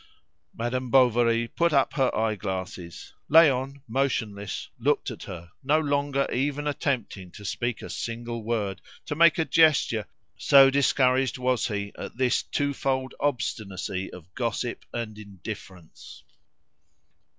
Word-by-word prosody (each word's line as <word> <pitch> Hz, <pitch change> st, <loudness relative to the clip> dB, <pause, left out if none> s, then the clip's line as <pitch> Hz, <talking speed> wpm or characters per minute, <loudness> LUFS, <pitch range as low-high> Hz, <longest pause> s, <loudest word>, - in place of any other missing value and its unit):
Madame 125 Hz, +2 st, -2 dB
Bovary 120 Hz, -2 st, +4 dB
put 170 Hz, +7 st, +1 dB
up 140 Hz, -3 st, +2 dB
her 135 Hz, -3 st, +2 dB
eyeglasses. 95 Hz, -5 st, -4 dB, 0.2 s
Léon, 140 Hz, -3 st, +4 dB
motionless, 110 Hz, -5 st, -2 dB
looked -, -, +1 dB
at -, -, -9 dB
her, 85 Hz, -2 st, -9 dB
no 150 Hz, +4 st, +3 dB
longer 140 Hz, -2 st, 0 dB
even 145 Hz, +3 st, -1 dB
attempting 125 Hz, -10 st, -2 dB
to 100 Hz, +3 st, -12 dB
speak 120 Hz, +2 st, -2 dB
a -, -, -7 dB
single 115 Hz, 0 st, -4 dB
word, 105 Hz, -4 st, -2 dB, 0.2 s
to -, -, -3 dB
make 170 Hz, +2 st, +5 dB
a 160 Hz, -, +1 dB
gesture, 155 Hz, -10 st, +3 dB, 0.3 s
so 135 Hz, -1 st, +6 dB
discouraged 130 Hz, -2 st, +2 dB
was 125 Hz, -1 st, +1 dB
he 100 Hz, -3 st, -4 dB
at -, -, -7 dB
this 125 Hz, -1 st, +2 dB
two 145 Hz, 0 st, -1 dB
fold 130 Hz, -1 st, -1 dB
obstinacy 100 Hz, -8 st, -2 dB
of 90 Hz, +1 st, -13 dB
gossip 120 Hz, 0 st, -3 dB
and 110 Hz, -3 st, -5 dB
indifference. 95 Hz, -4 st, -10 dB
120 Hz, 130 wpm, -26 LUFS, 105-140 Hz, 0.3 s, so